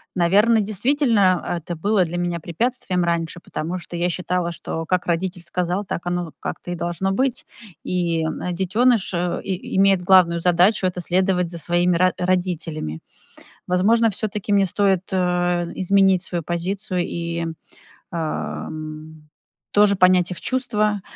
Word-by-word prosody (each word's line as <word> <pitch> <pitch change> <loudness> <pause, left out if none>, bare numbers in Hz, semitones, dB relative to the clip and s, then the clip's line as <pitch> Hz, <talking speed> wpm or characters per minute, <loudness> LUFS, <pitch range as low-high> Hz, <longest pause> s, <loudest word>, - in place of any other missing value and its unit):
Наверно, 205 +6 +4
действительно, 210 - +2
это 170 +1 -6
было 200 +3 +2
для 175 +1 -5
меня 175 -1 -2
препятствием 180 +1 -1
раньше, 170 0 -2
потому 170 +3 -4
что 175 0 -9
я 175 +1 +1
считала, 180 0 -2
что 165 -1 -5
как 180 +1 0
родитель 175 +1 -1
сказал, 180 +3 -2
так 175 - -5
оно 175 -2 -2
как-то 175 - -6
и - - -2
должно 175 +3 -2
быть. 260 +4 -1 0.4
И 170 -3 -1 0.3
детёныш, 205 +4 +2
э, 175 0 -1
и 190 -1 -4
имеет 195 -2 +4
главную 175 -2 +5
задачу- 180 +4 +3
это 180 0 -4
следовать 180 0 +1
за 170 - -5
своими 175 +1 +2
ро 185 +1 +3
родителями. 175 - -2 0.7
Возможно, 220 +6 +3
всё-таки 210 0 -2
мне 200 -1 +4
стоит, 195 0 +1
а, 180 -1 +1
изменить 190 -1 +3
свою 175 -3 -3
позицию 180 +3 -2
и, 170 -1 -3 0.7
а, 160 -2 -3
м, 155 0 -9 0.4
тоже 205 -1 +5
понять 185 -1 +4
их 180 - -7
чувства, 215 -6 0
180 Hz, 140 wpm, -22 LUFS, 170-195 Hz, 0.7 s, главную